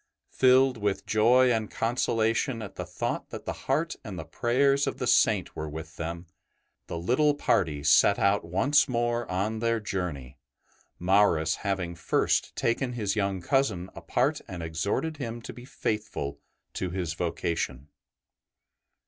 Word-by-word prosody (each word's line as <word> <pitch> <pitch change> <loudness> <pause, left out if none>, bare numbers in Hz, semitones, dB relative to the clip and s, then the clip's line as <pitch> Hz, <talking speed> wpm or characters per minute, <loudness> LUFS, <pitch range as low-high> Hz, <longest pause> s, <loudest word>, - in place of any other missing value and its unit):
Filled 130 0 +4
with 100 -2 -1
joy 120 +4 +4
and 110 -2 0
consolation 115 +1 0
at 100 - -8
the - - -6
thought - - -3
that - - -8
the - - -2 0.2
heart - - +1
and - - -7
the - - -6
prayers 140 +4 +2
of - - -2
the - - -2
Saint - - +3
were 75 0 -4
with 80 +2 -8
them, 85 +1 -5 0.6
the 85 - -4
little 130 - +2
party 80 - +1
set 75 +7 +5
out 100 +1 +2
once 135 - +2
more 120 -1 -1
on 105 +4 -1
their 115 0 +1
journey, 80 - -4 0.6
Maurus 90 -4 +3
having 95 -4 -2
first 85 - 0
taken 125 +2 0
his 105 -4 -1
young 100 -3 -1
cousin 110 -10 0
apart - - 0
and 90 -2 -6
exhorted 100 - -2
him 120 -4 -5
to 115 - -9
be 125 - -11
faithful 105 - -3 0.3
to 95 - -3
his 90 -3 -3
vocation. 80 -5 -3
105 Hz, 150 wpm, -27 LUFS, 85-120 Hz, 0.6 s, set